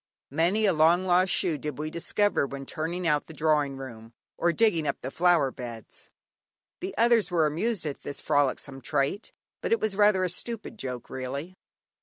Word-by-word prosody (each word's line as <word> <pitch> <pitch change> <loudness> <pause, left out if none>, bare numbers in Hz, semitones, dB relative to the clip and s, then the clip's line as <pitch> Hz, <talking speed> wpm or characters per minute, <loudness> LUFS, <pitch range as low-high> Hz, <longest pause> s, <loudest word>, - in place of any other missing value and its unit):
Many 175 +9 +2
a 195 - +4
long 165 +4 +4
lost 180 0 +3
shoe 160 -5 +1
did 150 -1 -5
we 155 +1 -4
discover 175 -1 +1
when 135 0 -7
turning 170 +5 -3
out 150 -3 +1
the 160 - -11
drawing 150 -3 +1
room, 115 -4 -9 0.2
or 175 - +2
digging 170 -5 +2
up - - -1
the 130 - -5
flower 170 -6 +3
beds. 120 -4 -9 0.7
The 375 +2 -6
others 235 -2 +4
were 170 -3 +2
amused 180 +6 -1
at 145 -2 -4
this 140 - -6
frolicsome 140 -1 0
trait, 145 - -1 0.3
but - - -3
it 460 - +4
was 215 -3 -1
rather 205 -2 +4
a 185 - +1
stupid 225 +3 -4
joke 125 -2 -5
really. 140 +7 -5
160 Hz, 180 wpm, -27 LUFS, 140-185 Hz, 0.7 s, a